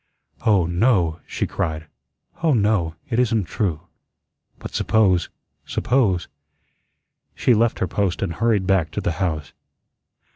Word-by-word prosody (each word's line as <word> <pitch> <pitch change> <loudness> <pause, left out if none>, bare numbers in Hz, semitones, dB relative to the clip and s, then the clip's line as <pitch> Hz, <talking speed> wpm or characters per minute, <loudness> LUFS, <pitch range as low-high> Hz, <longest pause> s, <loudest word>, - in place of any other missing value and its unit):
"Oh, 100 -5 +4
no," 85 -2 +2
she - - -2
cried. 80 0 -3 0.6
"Oh, 160 -5 +3
no. 100 -7 +1 0.2
It 115 - +1
isn't 115 -4 +2
true. 85 -4 -2 0.8
But - - -9
suppose 95 -6 +2 0.3
suppose." 105 -9 +1 1.1
She 125 - +3
left 115 +1 +2
her 95 - -1
post 95 +1 -1
and 90 -4 -2
hurried 105 0 +1
back 90 -4 +2
to - - -2
the - - 0
house. 80 -6 -2
95 Hz, 130 wpm, -22 LUFS, 85-110 Hz, 1.1 s, Oh